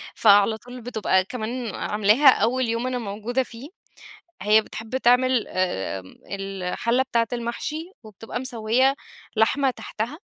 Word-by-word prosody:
فعلى 205 0 +5
طول 245 +2 -11
بتبقى 220 -5 +1
كمان 235 0 -4
عاملاها 215 +7 +3
أول 250 +1 +2
يوم 230 +2 -1
أنا 255 - -1
موجودة 225 +4 -2
فيه، 240 +4 -11 0.7
هي 215 +1 +5
بتحب 225 +3 -5
تعمل 250 -1 +3
آآ، 95 - -2 0.3
الحلة 195 +5 -1
بتاعة 235 -3 0
المحشي 270 +8 -4
وبتبقى 220 +2 -7
مسوّية 250 +2 +1 0.4
لحمة 265 +5 +3
تحتها 245 +5 -5
230 Hz, 120 wpm, -24 LUFS, 215-255 Hz, 0.7 s, فعلى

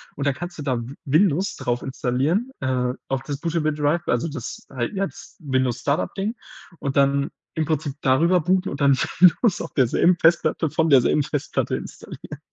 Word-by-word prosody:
Und 140 - -3
dann 140 - +2
kannst 175 +5 -7
du - - -6
dann 125 -4 -2
W-Windows 155 +6 +1
drauf 120 0 -2
installieren, 135 - -1
äh, 125 -1 0 0.2
auf 135 0 -1
das 145 -2 -4
bootable 160 -2 0
Drive, 150 +3 0
also 120 +6 +1
das 140 -6 -7
halt 125 - -3
jetzt 195 0 -5
Windows-Startup-Ding 140 - -1 0.4
und 140 -2 -3
dann 140 0 +2 0.3
im 160 - 0
Prinzip 150 -2 -1
darüber 165 +8 +3
booten 185 +3 +1
und 140 - -6
dann 140 -1 +5 0.2
Windows 185 +3 +5
auf - - -7
derselben 150 +7 +3
Festplatte 165 -1 +2
von 160 +2 +1
derselben 135 +1 +4
Festplatte 145 0 -2
installieren. - - -9
145 Hz, 165 wpm, -23 LUFS, 130-170 Hz, 0.4 s, dann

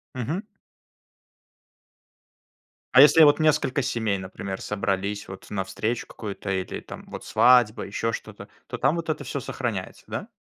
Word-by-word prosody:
Мгм. 140 - -2 2.5
А 130 - +10
если 155 +3 +8
я, - - +10
вот, 145 +1 +5
несколько 150 -3 +2
семей, 110 -5 -1
например, 95 +1 -6
собрались, 100 0 -2
вот, 95 0 -10
на 100 -2 -2
встречу 110 +5 -3
какую-то, 100 -2 -6
или, 95 -1 -3
там, - - -10
вот, - - -8
свадьба, 120 -3 +4
ещё 115 +3 -2
что-то, - - -8 0.2
то - - -5
там 145 +5 +2
вот 165 -1 -4
это 150 -2 -2
всё 140 - -4
сохраняется, 115 -6 -4
да? - - -5
115 Hz, 150 wpm, -25 LUFS, 100-140 Hz, 2.5 s, А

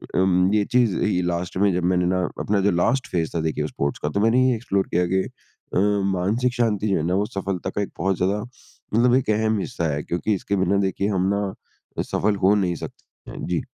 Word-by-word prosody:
अ, - - +3
अम 95 +1 +3
ये 105 -1 +3
चीज़ 120 -6 +3
ये 90 -4 +1
लास्ट 90 0 -2
में 100 0 +3
जब 90 -1 -1
मैंने 90 0 +2
ना 90 +1 +1 0.2
अपना 100 0 +1
जो 100 +1 +3
लास्ट 120 +10 +1
फ़ेज़ 85 -3 0
था, - - +1
देखिए 75 -1 -1
स्पोर्ट्स 70 -1 -3
का, 75 - 0
तो 100 - -1
मैंने 120 +4 +4
ये 125 - +2
एक्सप्लोर 100 -4 -1
किया 90 +1 +1
कि 95 +1 +1 0.5
अ, - - +3 0.3
मानसिक 110 +7 0
शांति 110 -4 0
जो 95 - +2
है 80 - -1
ना, 90 - 0
वो 100 +1 +1
सफलता 95 -2 -3
का 100 - -2
एक 100 - -3
बहुत 95 0 +1
ज़्यादा 100 +3 0 0.5
मतलब 120 +2 +4
एक 130 -4 +1
अहम 110 0 +2
हिस्सा 85 -5 -2
है 75 - -2
क्योंकि 90 +5 -1
इसके 100 +2 -2
बिना 95 +1 +2
देखिए 100 +1 -2
हम 95 -2 +1
ना 100 -1 -2 0.6
सफल 105 0 +1
हो 100 +2 +5
नहीं 90 -4 0
सकते - - -11
हैं, - - -6
जी। - - 0
95 Hz, 230 wpm, -23 LUFS, 90-105 Hz, 0.6 s, हो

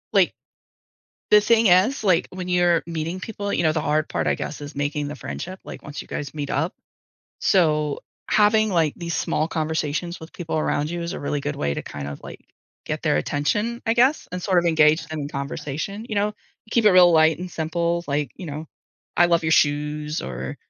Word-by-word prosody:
Like - - +4 1.0
the 210 - +8
thing 225 +1 +4
is, 195 +9 +4
like, 185 -3 +3
when 185 -1 -6
you're 175 -2 +3
meeting 165 +2 -4
people, 205 0 -5
you - - +1
know, 160 - +4
the 155 0 -1
hard 155 0 +1
part, - - -1
I - - +2
guess, 150 - -6
is 145 0 -8
making 145 +1 -2
the 145 - -5
friendship, 185 +6 -6
like, - - -9
once 150 0 -7
you - - -14
guys 145 -1 -5
meet 145 -2 -4
up. 160 +6 0 0.7
So, 150 -5 +2 0.3
having, 215 +1 +4
like, 165 -5 +2
these 170 -1 -4
small 155 +1 0
conversations 160 +1 -2
with 160 +1 -11
people 165 -2 -3
around 150 0 0
you 175 0 -3
is 170 - -4
a - - -6
really 145 0 -2
good 75 - -3
way 70 0 -1
to, - - -4
kind 70 -1 -7
of, 70 - -7
like, - - -10 0.4
get - - -4
their - - +2
attention, 210 - -1
I 225 - +3
guess, 255 +5 +3
and 180 0 -4
sort 185 -2 +2
of 175 - +2
engage 160 -1 +4
them 155 -1 -5
in 140 - -4
conversation, 150 +8 -5
you 215 - -3
know. 205 +1 +1 0.4
Keep 235 - +3
it - - +8
real 180 -2 +7
light 160 -1 +4
and 180 +1 -5
simple, 170 +1 -1
like, 145 -2 -1
you 185 - -8
know, 155 +1 -6 0.5
"I 175 - +6
love 170 -1 +2
your 160 - +2
shoes" 150 +1 +1
or, 65 +1 -5
160 Hz, 210 wpm, -23 LUFS, 150-185 Hz, 1.0 s, the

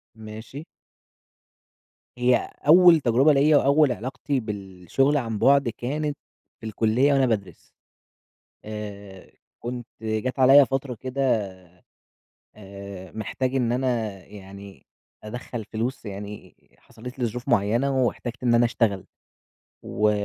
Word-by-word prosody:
ماشي. 110 +7 -9 1.5
هي 125 0 +2 0.2
أول 175 0 +8
تجربة 135 +3 +3
ليّا 145 +2 +4
وأول 140 0 +4
علاقتي 130 +3 -3
بالشغل 105 - -1
عن 115 -5 -3
بُعد، 140 +2 +4
كانت 145 +6 -3 0.4
في 110 - -11
الكلية 115 +6 +2
وأنا 135 -1 +3
بادرس. 105 -6 -2 1.1
آآ، 100 -3 -9 0.3
كنت 120 0 -5
جات 110 +4 -3
عليَّ 135 +2 +7
فترة 135 -2 -3
كده 130 -1 0 1.1
آآ، 100 -2 -10
محتاج 125 +6 -3
إن 120 -3 +1
أنا 120 -5 -1
يعني 100 -4 -12 0.4
أدخّل 115 0 -7
فلوس 120 +3 -3
يعني، 105 0 -8 0.2
حصلت 125 +4 -12
لي 125 - +1
ظروف 120 +3 -5
معيّنة 120 +5 +2
واحتجت 120 0 -4
إن 120 -1 +3
أنا 120 +1 +4
اشتغل، 110 -5 0 0.8
و 105 0 +1
120 Hz, 115 wpm, -24 LUFS, 105-135 Hz, 1.5 s, أول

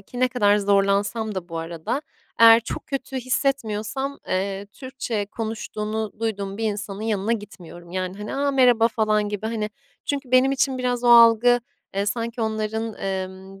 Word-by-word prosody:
ki 245 +5 -9
ne 255 - +4
kadar 210 -5 +3
zorlansam 200 +2 +1
da 180 -1 -5
bu 165 - -5
arada, 165 - -3 0.4
eğer 230 0 +9
çok 230 - -6
kötü 270 -1 -4
hissetmiyorsam, 260 0 -1
eee, 195 +1 -2
Türkçe 245 -6 -4
konuştuğunu 220 0 -4
duyduğum 200 -3 -3
bir 225 - -2
insanın 205 -1 -3
yanına 220 0 0
gitmiyorum. 175 -5 -8
Yani, 185 +1 -3
hani, 210 +4 -5
"A! 280 +1 +1
Merhaba." 245 -4 +4
falan 215 -2 +1
gibi, 210 +1 -4
hani 215 -2 -2 0.3
çünkü 280 -3 -3
benim 255 +1 +5
için 265 -1 0
biraz 245 -1 -1
o - - +4
algı, 235 +1 +7 0.3
eee, 200 +1 0
sanki 230 +3 -3
onların, 220 0 -2
emm, 190 0 -5
220 Hz, 160 wpm, -23 LUFS, 200-245 Hz, 0.4 s, eğer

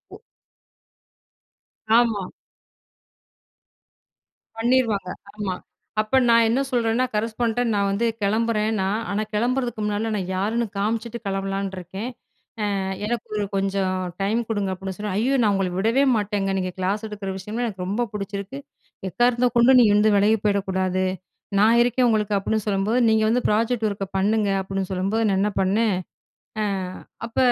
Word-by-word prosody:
ஒ. - - -14 1.8
ஆமா. 225 -5 +2 2.3
பண்ணிருவாங்க, 225 -5 +1 0.3
ஆமா. 195 -3 -2 0.5
அப்ப 215 +5 +1
நான் 230 -1 +5
என்ன 245 - +2
சொல்லுறேன்னா 240 0 +1
கரஸ்பாண்ட்ட 225 +2 0
நான் 200 -1 +1
வந்து 200 +4 0 0.2
கிளம்புறேன்னா, 215 -1 +1 0.2
ஆனா 205 - 0
கிளம்புறதுக்கு 240 +1 0
முன்னாடி 210 +2 -1
நான் 190 -3 -3
யாருன்னு 220 +5 0
காமிச்சுட்டு 225 +3 -2
கிளம்பலான்னு 195 0 -2
இருக்கேன். 190 +6 -6 0.7
அ - - 0 0.3
எனக்கு 235 0 -2
ஒரு 210 - 0
கொஞ்சம் 195 -1 0 0.3
டைம் 215 +4 +1
குடுங்க, 205 -3 -1
அப்படின்னு 190 0 -6
சொன்னா. 210 -2 -3
ஐய்யோ! 255 +5 +1
நான் 210 - +3
உங்கள 195 -2 0
விடவே 230 +8 +3
மாட்டேங்க. 205 -2 -1
நீங்க 185 -1 -2
கிளாஸ் 200 +4 -1
எடுக்கிற 205 -2 -5
விஷயம்லாம், 215 +5 -3
எனக்கு 185 -3 -5
ரொம்ப 230 +5 -1
பிடிச்சிருக்கு. 200 +6 -5 0.5
எக்காரணத்த 240 +4 +2
கொண்டு 245 +3 +6
நீ - - +7
இருந்து 210 +1 +4
விலகி 210 +2 +4
போயிடக்கூடாது. 190 -2 0 0.5
நான் 225 +3 +5
இருக்கேன் 245 +1 +2
உங்களுக்கு. 210 -2 +1
அப்படின்னு, 215 +1 -1
சொல்லும்போது 205 +4 +1
நீங்க 220 0 +3
வந்து 245 +2 +2
ப்ராஜெக்ட் 225 +1 +1
ஒர்க்க 200 -1 -4
பண்ணுங்க. 210 +1 +2
அப்படின்னு 195 0 -3
சொல்லும்போது, 195 +5 0
நான் 195 -1 +1
என்ன 210 +1 +2
பண்ணேன்? 205 +2 +2 0.7
அ - - +1 0.6
அப்ப 230 - -7
210 Hz, 135 wpm, -23 LUFS, 195-230 Hz, 2.3 s, நீ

